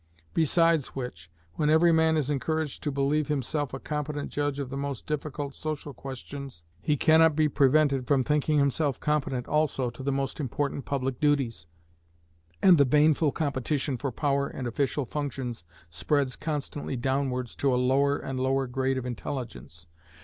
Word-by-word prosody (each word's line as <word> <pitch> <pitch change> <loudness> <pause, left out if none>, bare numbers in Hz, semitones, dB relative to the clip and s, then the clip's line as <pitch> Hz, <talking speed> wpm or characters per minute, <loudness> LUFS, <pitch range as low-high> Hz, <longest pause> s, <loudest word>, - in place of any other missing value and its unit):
Besides 165 -2 +2
which, 90 -11 -6 0.3
when 150 - +2
every 160 +2 +5
man 160 -1 +3
is 150 -1 0
encouraged 155 +1 -2
to 145 - -2
believe 140 +2 +1
himself 145 0 -1
a 135 - -5
competent 150 0 -4
judge 145 -1 -1
of 140 -2 -4
the - - -4
most 140 -2 -4
difficult 145 -1 -4
social 150 -1 -5
questions, 135 -5 -8 0.2
he 150 - +1
cannot 160 +1 +5
be 155 0 +3
prevented 140 -2 +3
from 135 -1 +3
thinking 150 +2 +1
himself 140 0 +1
competent 135 -4 -1
also 145 -5 +1
to - - -11
the 140 +1 -1
most 135 +1 -2
important 140 +1 -2
public 135 -2 -2
duties, 135 - +1 1.0
and 180 -5 +7
the - - +8
baneful 150 +2 +4
competition 140 -1 -1
for 135 +2 -3
power 140 +1 0
and 130 -3 -5
official 140 +3 -1
functions 130 - -4 0.3
spreads 130 - 0
constantly 150 -3 -4
downwards 130 -1 -1
to 140 - +2
a 125 - +2
lower 135 +3 +2
and 135 -1 -5
lower 135 +1 +1
grade 130 +1 -1
of 130 - -3
intelligence. 120 - -6
140 Hz, 160 wpm, -27 LUFS, 130-150 Hz, 1.0 s, the